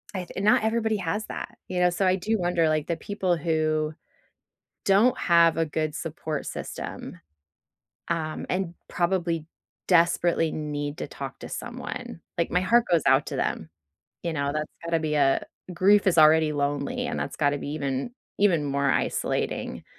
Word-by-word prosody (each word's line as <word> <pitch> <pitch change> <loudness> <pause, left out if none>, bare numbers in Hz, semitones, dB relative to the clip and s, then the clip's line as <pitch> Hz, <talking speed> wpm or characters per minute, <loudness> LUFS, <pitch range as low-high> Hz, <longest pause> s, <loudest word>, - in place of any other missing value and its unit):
I 185 -1 -3
th 190 - -6
not 210 +1 +4
everybody 220 -1 +1
has 205 +3 -2
that, - - -7
you 180 - -1
know? 180 0 +5
So 185 +3 0
I 185 - +4
do 215 +4 0
wonder, 175 -2 +2
like, 155 -1 0
the 170 - -1
people 185 -4 -1
who 155 -1 0 0.9
don't 205 +6 +4
have 170 -2 +4
a 165 - +3
good 155 0 -2
support 155 -2 -4
system, - - -6 0.9
um, 160 -2 -2
and 180 -2 -1 0.2
probably 170 -3 0 0.4
desperately 170 -2 +3
need 145 -1 -4
to - - -4
talk - - -7
to - - -8
someone. 80 - -6 0.2
Like, 170 - 0
my 180 - +2
heart 235 +5 +4
goes 170 -2 +4
out - - +5
to - - -4
them, 80 - -2 0.5
you 170 - -2
know? 140 -2 -1
That's 155 0 -3
gotta 170 -1 +1
be 155 -1 -1
a 135 -2 +3 0.3
grief 200 +4 +4
is 185 - +3
already 155 0 +6
lonely, 145 - -1
and - - -3
that's - - -4
gotta 145 -1 +1
be - - -6
even 140 - -2 0.3
even 180 -7 +3
more 140 0 +1
isolating. - - -1
165 Hz, 170 wpm, -26 LUFS, 155-185 Hz, 0.9 s, already